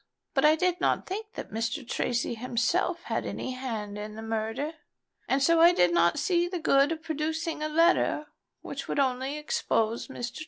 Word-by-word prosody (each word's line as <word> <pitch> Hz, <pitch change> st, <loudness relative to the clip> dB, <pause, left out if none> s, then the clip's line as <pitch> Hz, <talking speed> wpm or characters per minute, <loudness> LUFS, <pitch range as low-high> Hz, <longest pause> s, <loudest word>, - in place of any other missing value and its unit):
But 275 Hz, 0 st, +3 dB
I 305 Hz, +1 st, +7 dB
did 360 Hz, +1 st, 0 dB
not -, -, +1 dB
think 425 Hz, +4 st, -6 dB
that -, -, -7 dB
Mr. 230 Hz, +4 st, -3 dB
Tracy 240 Hz, 0 st, -1 dB
himself 250 Hz, -, 0 dB
had -, -, -2 dB
any 260 Hz, -, -4 dB
hand 220 Hz, -6 st, -5 dB
in 210 Hz, 0 st, -6 dB
the 220 Hz, -, -7 dB
murder; 225 Hz, +7 st, -2 dB, 0.5 s
and 270 Hz, +1 st, +2 dB
so 330 Hz, +3 st, +4 dB
I 340 Hz, +1 st, +8 dB
did 175 Hz, -, +3 dB
not 170 Hz, 0 st, +3 dB
see 350 Hz, -2 st, +1 dB
the 360 Hz, 0 st, -3 dB
good 280 Hz, -2 st, +3 dB
of 320 Hz, 0 st, -4 dB
producing 315 Hz, +1 st, -2 dB
a 305 Hz, -, -1 dB
letter 330 Hz, -1 st, +3 dB, 0.4 s
which -, -, -6 dB
would -, -, -3 dB
only 265 Hz, +1 st, 0 dB
expose 230 Hz, -6 st, -1 dB
Mr. -, -, -31 dB, 0.2 s
Tracy." -, -, -8 dB
280 Hz, 190 wpm, -28 LUFS, 230-330 Hz, 0.5 s, I